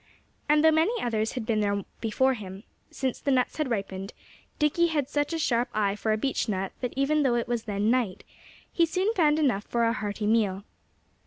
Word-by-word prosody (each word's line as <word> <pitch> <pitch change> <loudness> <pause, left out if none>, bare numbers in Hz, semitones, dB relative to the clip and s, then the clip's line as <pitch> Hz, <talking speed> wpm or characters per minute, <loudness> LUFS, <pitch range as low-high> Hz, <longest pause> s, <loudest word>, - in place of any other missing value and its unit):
And 300 0 +4
though 320 - +7
many 335 +10 +2
others 220 -2 -1
had 250 -4 -4
been 220 -1 +1
there 200 -1 0 0.2
before 260 +4 +2
him, 195 -3 -8 0.3
since 260 -2 -3
the - - -3
nuts 255 -2 +1
had 305 -4 -1
ripened, 195 -3 -4 0.4
Dickie 315 +3 +2
had 295 -5 -1
such 290 +1 0
a 330 - -1
sharp 245 -6 +1
eye 205 -2 +1
for 220 +1 -1
a 215 - +2
beech 260 0 -1
nut 195 -1 -2
that 250 -2 -3
even 285 +3 +2
though 260 -4 +2
it 235 - -1
was 235 -2 -2
then 205 +1 0
night, 240 -7 0 0.5
he 335 -1 +3
soon 380 +6 0
found 310 -6 +3
enough 250 -10 +1
for 235 -1 0
a 230 0 +2
hearty 210 -2 -3
meal. 210 -3 +1
240 Hz, 210 wpm, -27 LUFS, 210-295 Hz, 0.5 s, though